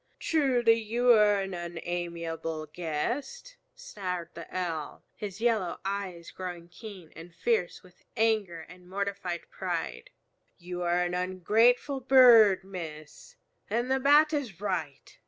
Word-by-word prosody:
"Truly, 255 -7 +3
you 235 +3 +2
are 210 -3 +5
an 195 -1 -5
unamiable 170 -2 -4
guest," 235 - -4 0.2
snarled 185 - -5
the 170 - -9
Owl, 165 -5 -4
his 200 -1 -7
yellow 220 -6 0
eyes 190 -4 -4
growing 175 -2 -7
keen 185 -3 -11
and 165 +2 -11
fierce 465 -1 -1
with - - -20 0.2
anger 215 -7 +1
and 180 +2 -15
mortified 195 -3 -4
pride. 60 0 -4 0.5
"You 180 +1 -6
are 175 0 +1
an 175 0 -2
ungrateful 215 - +2
bird, 240 -7 +7
Miss, 160 -5 -9 0.3
and 240 +4 -1
the 265 - +2
Bat 295 +3 +5
is 250 - -3
right. 170 -9 -4
190 Hz, 125 wpm, -28 LUFS, 170-230 Hz, 0.5 s, bird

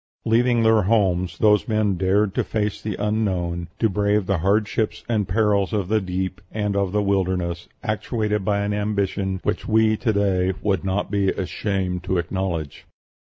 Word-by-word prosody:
Leaving 120 +1 +3
their 110 -1 +5
homes, 95 -3 +1
those 105 -1 +3
men 110 -3 +1
dared 95 +2 +1
to - - 0
face 105 -2 -2
the 105 -3 -3
unknown, 95 -5 -1
to 115 - +2
brave 105 0 +1
the 95 -2 0
hardships 105 +4 0
and 110 -5 0
perils 100 0 +1
of 100 -4 -1
the 110 0 +2
deep 95 +1 -3
and 105 -2 -2
of 100 -2 0
the 105 +1 +1
wilderness, 95 -3 -1
actuated 110 -2 -1
by 100 +1 +1
an 100 0 -1
ambition 100 -2 -1
which - - -2
we 110 0 +3
to 110 +1 0
day 95 -3 +1
would 100 -2 +1
not 95 +2 -1
be 100 -2 +2
ashamed 95 -2 -2
to 90 0 0
acknowledge." 85 -4 -3
100 Hz, 170 wpm, -23 LUFS, 95-105 Hz, -, their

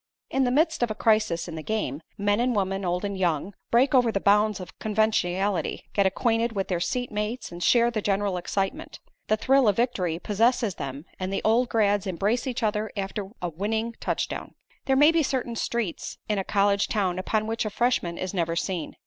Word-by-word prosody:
In 270 0 +2
the - - +2
midst 315 +3 +2
of 240 - +2
a 215 - -3
crisis 215 -7 +2
in 170 - -6
the 160 - -5
game, 160 -7 -2 0.2
men 205 +1 +1
and 245 0 +1
women, 195 -1 -1
old 180 +2 -1
and 200 -1 -3
young, 180 0 0 0.2
break 250 +4 +3
over 245 -3 +4
the 195 - 0
bounds 210 +1 +3
of 185 - -10
conventionality, 205 -4 0
get 200 -2 +3
acquainted 225 +3 +1
with 195 -2 -2
their 180 -2 0
seat 245 +7 -2
mates 210 +4 -3
and 175 0 -8
share 240 -1 +4
the 220 -2 -2
general 200 -1 0
excitement. 195 - -3 0.3
The 215 - +2
thrill 265 +2 +3
of 205 - +4
victory 200 -9 0
possesses 220 +3 +1
them 140 0 -6
and 185 0 -3
the 195 - -2
old 235 +3 +3
grads 205 -3 +2
embrace 205 +8 0
each 250 -2 -3
other 210 0 0
after 195 0 -3
a 175 - 0
winning 220 +7 -2
touchdown. - - -3 0.3
There 265 - +2
may 295 +4 +6
be 330 0 +3
certain 260 -4 -1
streets 230 -6 -3
in 210 -2 0
a - - -1
college 200 0 +2
town 185 -4 0
upon 215 +3 0
which 225 +1 -1
a 215 - -2
freshman 210 -6 0
is 185 +1 -4
never 170 -3 0
seen. 170 -1 -3
210 Hz, 205 wpm, -26 LUFS, 190-235 Hz, 0.3 s, may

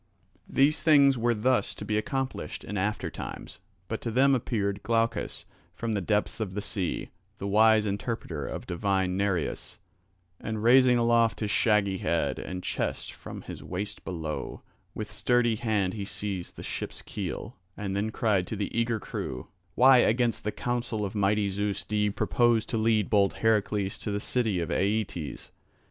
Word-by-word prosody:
These 145 +3 +3
things 140 -4 +6
were 120 0 +1
thus 125 +4 +1
to - - -7
be 105 - -1
accomplished 130 +5 -3
in 105 - -6
after 100 +2 -1
times. - - -7 0.3
But 110 - -4
to 115 - -3
them 135 +4 +4
appeared 105 -5 -1
Glaucus 115 0 0 0.3
from 115 -1 -2
the 100 - 0
depths 105 +4 0
of 100 -4 -3
the 105 - -1
sea, 100 -3 -3 0.3
the - - -6
wise 110 +1 +5
interpreter 100 - -3
of - - -5
divine 95 0 0
Nereus, 95 -4 -1 0.6
and 110 0 -4
raising 125 +1 +6
aloft 115 -1 +3
his 105 -2 -1
shaggy 100 -4 +2
head 85 -1 0
and 90 0 -5
chest - - -3
from - - -9
his - - -8
waist 100 +3 -5
below, 80 -4 -5 0.3
with 105 -1 -5
sturdy 120 -2 +2
hand 105 -5 0
he 105 - -4
seized 95 -3 -4
the - - -8
ship's - - -5
keel, - - -5 0.2
and 100 -2 -3
then 105 +2 0
cried 105 -5 +1
to - - -4
the 105 0 -3
eager 115 -1 +1
crew: 65 -9 -5 0.3
"Why 130 0 +7
against 120 -1 +2
the 105 - -1
counsel 120 -1 -2
of 95 - -5
mighty 100 0 +1
Zeus 100 -1 -2
do 105 - -3
ye 105 0 +2
purpose 120 +2 +2
to 115 - -2
lead 110 -2 +2
bold 100 -2 +3
Heracles 105 -3 +1
to - - -4
the 100 0 -1
city 110 -4 0
of 85 - -3
Aeetes? 100 -6 -2
105 Hz, 170 wpm, -28 LUFS, 100-115 Hz, 0.6 s, Why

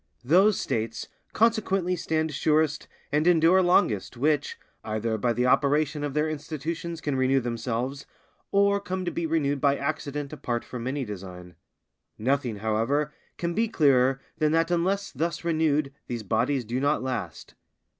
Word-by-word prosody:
Those 185 +10 +4
States 115 0 -3 0.2
consequently 195 -5 +1
stand 160 -2 -1
surest 155 +1 +1 0.2
and 150 +3 +2
endure 175 +2 +5
longest 175 - +2
which, 145 +3 0 0.3
either 110 +1 -2
by 120 +3 0
the 120 +2 0
operation 145 +3 +2
of 145 -1 -3
their 150 +1 +2
institutions 155 +2 -4
can 145 -2 -1
renew 130 +1 +3
themselves, 120 +3 -3 0.4
or 200 0 +3
come 185 -2 -4
to 175 - -1
be 170 - -2
renewed 145 -4 0
by 140 0 +3
accident 140 +1 -3
apart 120 -5 -3
from 125 -1 -6
any 135 0 -2
design. 90 -3 -8 0.6
Nothing, 130 0 0
however, 115 +8 0 0.2
can 170 0 -2
be 225 +5 +1
clearer 135 - +3 0.2
than 155 0 +2
that 165 +1 +2
unless 190 +4 0
thus 155 +3 -2
renewed 155 -4 +1
these 120 -2 -4
bodies 120 +5 0
do 120 +4 -2
not 145 0 +1
last. 105 - -5
145 Hz, 150 wpm, -26 LUFS, 125-165 Hz, 0.6 s, endure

